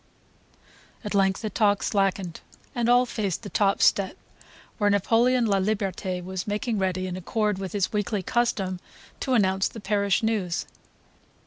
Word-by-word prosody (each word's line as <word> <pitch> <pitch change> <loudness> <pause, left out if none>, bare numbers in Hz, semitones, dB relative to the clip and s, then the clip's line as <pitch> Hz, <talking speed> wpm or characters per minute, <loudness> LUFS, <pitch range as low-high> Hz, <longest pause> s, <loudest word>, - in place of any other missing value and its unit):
At 210 - -4
length 195 +1 +2
the 215 - -2
talk 205 -1 +2
slackened 195 -4 0 0.3
and 240 -1 0
all 245 +1 +5
faced 210 -5 -3
the 205 - -7
top 200 -1 +2
step, 195 -2 +3 0.6
where 205 -1 +3
Napoleon 230 +5 +3
Laliberte 195 -2 -1
was 185 +1 -5
making 210 +1 -1
ready, 185 -1 -1
in 185 -1 -4
accord 210 +2 -1
with 190 -1 -5
his 200 0 0
weekly 205 -1 -1
custom, 195 -5 0 0.4
to 260 -2 0
announce 190 -3 +2
the 225 - -9
parish 200 0 +1
news. 205 -6 0
200 Hz, 145 wpm, -25 LUFS, 190-220 Hz, 0.6 s, all